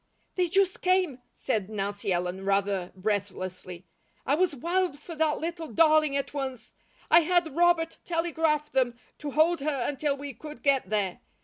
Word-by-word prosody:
"They 360 -1 +1
just 385 +1 +2
came," 365 -8 +1
said 215 -6 -2
Nancy 200 -1 -3
Ellen 180 +2 -1
rather 195 -2 0
breathlessly. 185 -3 -4 0.4
"I 275 - +2
was 340 0 +2
wild 345 +3 0
for 335 +3 -9
that 315 -1 +1
little 335 0 -4
darling 310 -3 +4
at 275 - -3
once. 265 -5 -5 0.4
I 335 - +9
had 340 -3 +1
Robert 340 -1 +2
telegraph 325 -3 0
them 245 -3 +1 0.2
to 295 - -4
hold 315 +4 +3
her 275 -3 -1
until 285 0 -1
we 280 0 -6
could 300 +6 -10
get 275 -2 +2
there. 205 -4 -1
285 Hz, 155 wpm, -28 LUFS, 210-330 Hz, 0.4 s, I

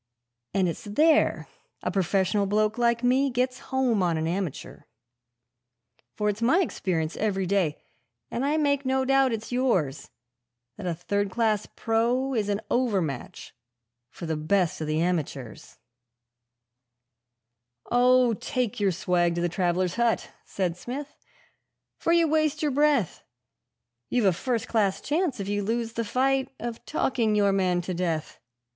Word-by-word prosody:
And 190 -2 +3
it's 170 - -5
there 305 +10 +3 0.4
a - - -1
professional 195 +1 +1
bloke 215 +3 +1
like 235 0 +2
me 260 +3 +3
gets 255 0 -1
home 255 -6 +1
on 170 -3 +1
an 160 - -1
amateur: 175 -2 -4 1.3
For 210 - -1
it's 210 +1 -1
my 265 +11 +4
experience 170 - -2
every 195 -3 0
day, 180 -5 +1 0.5
and 240 - -2
I 295 +3 +1
make 285 -2 +1
no 265 0 +1
doubt 270 -1 +3
it's 225 +1 -4
yours, 185 - 0 0.7
That 200 -3 -6
a 170 - -1
third 200 +4 -1
class 215 0 0
pro 240 +4 0
is 215 -4 0
an 205 +1 -1
over 240 -6 +2
match 140 -7 -5 0.6
for 170 - -9
the 160 -1 -1
best 165 +2 0
of 155 - -3
the 155 +1 0
amateurs 155 -8 -3 1.0
' 120 -1 -33
'Oh, 250 0 +4
take 245 0 -2
your 200 -2 +2
swag 175 -1 +1
to 170 - -1
the 175 - +1
travellers' 180 +1 0
hut,' 235 -1 +1
said 180 -3 -2
Smith, 275 +9 -6 0.8
'for 335 - 0
you 335 -1 +4
waste 310 0 +1
your 295 - +1
breath; 285 - +1 0.9
You've 245 -4 +1
a 190 - +5
first 240 +5 -2
class 205 -4 +1
chance, 300 - -1
if 195 - -4
you 205 0 -1
lose 225 +2 -2
the 230 - -2
fight, 265 +4 +1
of 235 -1 -5
talking 235 -7 +1
your 200 -1 +3
man 185 -2 +1
to 180 +1 -4
death. 170 -3 -3
210 Hz, 150 wpm, -26 LUFS, 175-255 Hz, 1.3 s, a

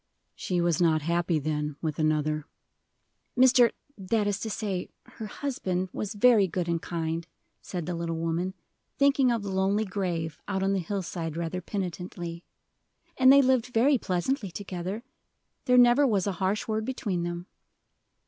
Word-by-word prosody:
"She 180 -1 -2
was 170 -1 +1
not 160 -3 +3
happy, 170 +1 +1
then, 150 0 -2
with 155 -2 -3
another." 155 -1 0 0.9
"Mr. 250 -2 +6 0.3
that 205 +2 0
is 205 -1 0
to 220 - -4
say, 200 -4 -3 0.2
her 220 - -8
husband 190 -8 -3
was 210 +1 -4
very 215 -2 +5
good 175 0 -2
and 170 -1 0
kind," 165 -1 -3 0.3
said 175 -4 -5
the 175 - -3
little 170 -1 -3
woman, 165 +3 -2 0.4
thinking 275 -2 +4
of 230 -3 -1
the 200 - -4
lonely 195 +3 +1
grave 175 -5 -3
out 190 0 -1
on 195 0 +2
the 195 - +1
hillside 170 -3 -4
rather 170 +2 -3
penitently, 175 -2 -5 0.7
"and 260 0 +6
they 280 0 +7
lived 255 -2 +2
very 250 +3 +3
pleasantly 195 +5 -1
together. 190 +3 -5 0.6
There 250 -2 +4
never 245 +3 +6
was 200 -6 +1
a 200 - 0
harsh 195 +3 0
word 220 0 -1
between 215 -7 -2
them." 175 0 -4
185 Hz, 160 wpm, -27 LUFS, 170-220 Hz, 0.9 s, they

